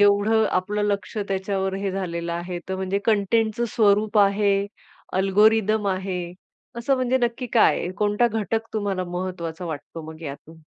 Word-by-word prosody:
एवढं 205 Hz, +2 st, +4 dB
आपलं 205 Hz, +3 st, -2 dB
लक्ष 205 Hz, +1 st, -2 dB
त्याच्यावर 190 Hz, 0 st, -1 dB
हे 195 Hz, 0 st, -2 dB
झालेलं 170 Hz, -3 st, -3 dB
आहे, 175 Hz, +1 st, -4 dB
तर 190 Hz, -, -2 dB
म्हणजे 190 Hz, +1 st, -1 dB
कंटेंटचं 220 Hz, +2 st, +2 dB
स्वरूप 210 Hz, 0 st, +3 dB
आहे, 200 Hz, 0 st, +3 dB, 0.5 s
अल्गोरिदम 210 Hz, +2 st, +3 dB
आहे, 185 Hz, -1 st, -2 dB, 0.5 s
असं 235 Hz, +4 st, +1 dB
म्हणजे 255 Hz, 0 st, +1 dB
नक्की 240 Hz, +1 st, -1 dB
काय 230 Hz, -, +5 dB
आहे? 180 Hz, -, -3 dB
कोणता 210 Hz, +4 st, +2 dB
घटक 225 Hz, +1 st, -2 dB
तुम्हाला 200 Hz, -4 st, -1 dB
महत्वाचा 175 Hz, -1 st, -5 dB
वाटतो 160 Hz, +1 st, -6 dB
मग 160 Hz, -, -14 dB
यातून? 160 Hz, +2 st, -9 dB
200 Hz, 145 wpm, -24 LUFS, 185-215 Hz, 0.5 s, काय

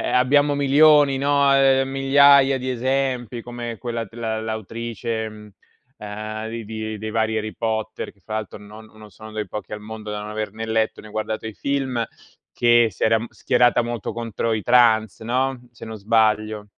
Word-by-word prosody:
ehm, -, -, -4 dB
e -, -, -1 dB
abbiamo 145 Hz, +3 st, +3 dB
milioni, 145 Hz, 0 st, +5 dB
no, 140 Hz, 0 st, +3 dB
ehm 135 Hz, -1 st, +4 dB
migliaia 135 Hz, 0 st, +5 dB
di 130 Hz, 0 st, -3 dB
esempi, 125 Hz, -2 st, -1 dB
come 120 Hz, -1 st, -6 dB
quella 115 Hz, -2 st, -4 dB
de 110 Hz, +2 st, -16 dB
la 110 Hz, -2 st, -3 dB
l'autrice, 110 Hz, +1 st, -4 dB
ehm 105 Hz, -1 st, -10 dB, 0.5 s
ehm, 110 Hz, +1 st, -6 dB
di 115 Hz, 0 st, -6 dB
di 110 Hz, 0 st, -5 dB
dei 110 Hz, +1 st, -5 dB
vari 110 Hz, 0 st, 0 dB
Harry 110 Hz, 0 st, -5 dB
Potter, 110 Hz, -1 st, -3 dB
che 100 Hz, -, -32 dB
fa 110 Hz, +5 st, -5 dB
alto 110 Hz, -2 st, -5 dB
non 105 Hz, +2 st, -13 dB
non 110 Hz, -1 st, -15 dB
sono 110 Hz, +1 st, -12 dB
dei 105 Hz, -2 st, -4 dB
pochi 105 Hz, +1 st, -7 dB
al 105 Hz, -, -5 dB
mondo 110 Hz, 0 st, -8 dB
da 105 Hz, 0 st, -4 dB
non 105 Hz, 0 st, -7 dB
aver 105 Hz, -2 st, -4 dB
né 110 Hz, +1 st, -6 dB
letto 110 Hz, 0 st, 0 dB
né 110 Hz, -, -13 dB
guardato 110 Hz, +1 st, -4 dB
i 110 Hz, -, -6 dB
film, 130 Hz, -3 st, -1 dB, 0.5 s
che 120 Hz, -1 st, +4 dB
si 90 Hz, -, -3 dB
era, 115 Hz, 0 st, +4 dB
uhm, 115 Hz, -, -6 dB
schierata 120 Hz, 0 st, +2 dB
molto 120 Hz, -2 st, -4 dB
contro 115 Hz, -1 st, -3 dB
i 110 Hz, -2 st, -1 dB
trans, 115 Hz, -4 st, +3 dB
no, 130 Hz, +3 st, -1 dB
se 120 Hz, -, -12 dB
non 110 Hz, -1 st, -7 dB
sbaglio. 110 Hz, 0 st, +1 dB
115 Hz, 195 wpm, -22 LUFS, 110-125 Hz, 0.5 s, milioni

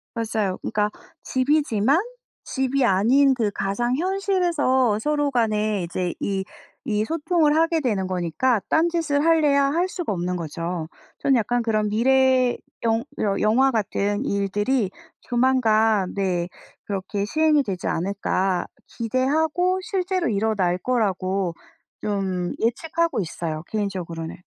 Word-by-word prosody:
맞아요. 215 Hz, -4 st, -1 dB
그러니까 210 Hz, 0 st, 0 dB, 0.3 s
집이지만 270 Hz, -1 st, +2 dB, 0.4 s
집이 265 Hz, 0 st, 0 dB
아닌 245 Hz, +7 st, +4 dB
그 220 Hz, -4 st, 0 dB
가상현실에서 265 Hz, -, +1 dB
서로 290 Hz, +3 st, 0 dB
간에 215 Hz, -5 st, +1 dB
이제 175 Hz, +1 st, -3 dB
이 195 Hz, -1 st, -1 dB, 0.4 s
이 215 Hz, -4 st, 0 dB
소통을 320 Hz, +1 st, +1 dB
하게 330 Hz, 0 st, +2 dB
되는 205 Hz, -8 st, 0 dB
거니까 185 Hz, +6 st, 0 dB
딴 325 Hz, +2 st, +3 dB
짓을 315 Hz, -4 st, 0 dB
하려야 300 Hz, -4 st, +4 dB
할 335 Hz, +6 st, +1 dB
수가 350 Hz, -, -4 dB
없는 180 Hz, 0 st, -2 dB
거죠. 165 Hz, 0 st, -4 dB, 0.3 s
전 270 Hz, -, +3 dB
약간 240 Hz, +1 st, +1 dB
그런 215 Hz, -2 st, 0 dB
'미래 255 Hz, +2 st, +3 dB, 0.3 s
영 225 Hz, 0 st, +1 dB, 0.2 s
영 200 Hz, -2 st, 0 dB
영화 245 Hz, +6 st, +4 dB
같은 205 Hz, 0 st, -1 dB
일들이 205 Hz, +1 st, 0 dB, 0.3 s
조만간 225 Hz, -5 st, +2 dB
네 180 Hz, -3 st, 0 dB, 0.4 s
그렇게 200 Hz, 0 st, -3 dB
시행이 305 Hz, +4 st, +3 dB
되지 190 Hz, -7 st, -4 dB
않을까.' 190 Hz, 0 st, -1 dB, 0.2 s
기대하고 315 Hz, -, 0 dB
실제로 370 Hz, -, -1 dB
일어날 200 Hz, -4 st, +1 dB
거라고 190 Hz, -5 st, 0 dB, 0.5 s
좀 190 Hz, -4 st, -2 dB
예측하고 325 Hz, +6 st, 0 dB
있어요 160 Hz, -3 st, -4 dB
개인적으로는. 180 Hz, -6 st, -4 dB
225 Hz, 270 characters per minute, -23 LUFS, 195-280 Hz, 0.5 s, 아닌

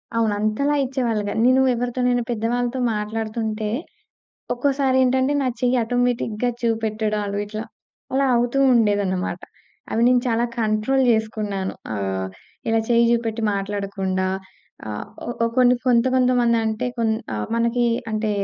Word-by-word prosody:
అవును. 225 Hz, -2 st, +2 dB
అంతలా 215 Hz, +8 st, +1 dB
ఇచ్చేవాళ్ళు 245 Hz, -5 st, -1 dB
కాదు. 215 Hz, -, -2 dB
నేను 260 Hz, +1 st, +5 dB
ఎవరితోనైనా 245 Hz, 0 st, 0 dB
పెద్దవాళ్ళతో 240 Hz, +2 st, -1 dB, 0.2 s
మాట్లాడుతుంటే, 215 Hz, 0 st, -3 dB, 0.9 s
ఒక్కోసారేంటంటే 260 Hz, 0 st, +2 dB
నా 265 Hz, -, 0 dB
చెయ్యి 250 Hz, 0 st, +2 dB
ఆటోమేటిక్‌గా 245 Hz, -1 st, 0 dB
చూపెట్టడాలు 215 Hz, -3 st, -1 dB
ఇట్లా, 215 Hz, +1 st, -5 dB, 0.5 s
అలా 275 Hz, +1 st, +2 dB
అవుతూ 240 Hz, +3 st, +1 dB, 0.2 s
ఉండేదన్నమాట. 200 Hz, -5 st, +1 dB, 0.5 s
అవి 225 Hz, -, +1 dB
నేను 250 Hz, 0 st, +4 dB
చాలా 230 Hz, +1 st, +1 dB, 0.2 s
కంట్రోల్ 220 Hz, +5 st, +1 dB
జేసుకున్నాను. 215 Hz, -3 st, -1 dB, 0.2 s
ఆహ్, 95 Hz, -2 st, -2 dB, 0.4 s
ఇలా 225 Hz, 0 st, +3 dB
చెయ్యి 235 Hz, 0 st, +4 dB
జూపెట్టి 230 Hz, -1 st, 0 dB
మాట్లాడకుండా 195 Hz, -1 st, -2 dB, 0.6 s
ఆహ్, 105 Hz, -1 st, -5 dB, 0.4 s
ఓ -, -, +3 dB
కొన్ని 250 Hz, -1 st, +5 dB
కొంత 240 Hz, -2 st, +4 dB
కొంతమందంటే, 240 Hz, -3 st, +2 dB, 0.5 s
ఆహ్, 105 Hz, 0 st, -3 dB
మనకి 235 Hz, +1 st, +1 dB, 0.3 s
అంటే 215 Hz, 0 st, -1 dB
225 Hz, 115 wpm, -22 LUFS, 215-245 Hz, 0.9 s, నేను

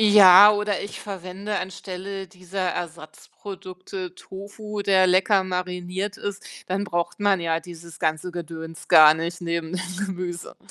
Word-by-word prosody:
Ja, 205 Hz, -2 st, +9 dB
oder 205 Hz, -1 st, -1 dB
ich 200 Hz, -, -7 dB
verwende 195 Hz, +1 st, -5 dB
anstelle 190 Hz, +1 st, -6 dB
dieser 185 Hz, 0 st, -4 dB
Ersatzprodukte 180 Hz, +3 st, -8 dB
Tofu, 205 Hz, +2 st, -7 dB
der 190 Hz, -2 st, +4 dB
lecker 190 Hz, +2 st, +3 dB
mariniert 180 Hz, +2 st, -3 dB
ist, 200 Hz, -1 st, -6 dB, 0.2 s
dann 190 Hz, +2 st, -1 dB
braucht 175 Hz, -1 st, -3 dB
man 200 Hz, -2 st, +3 dB
ja 165 Hz, -1 st, 0 dB
dieses 170 Hz, -1 st, -12 dB
ganze 160 Hz, +2 st, -1 dB
Gedöns 165 Hz, -1 st, -8 dB
gar 155 Hz, 0 st, +8 dB
nicht 170 Hz, +2 st, -4 dB
neben 170 Hz, -1 st, -3 dB
dem 185 Hz, +2 st, -3 dB
Gemüse. 180 Hz, -2 st, -6 dB
185 Hz, 135 wpm, -24 LUFS, 170-195 Hz, 0.2 s, Ja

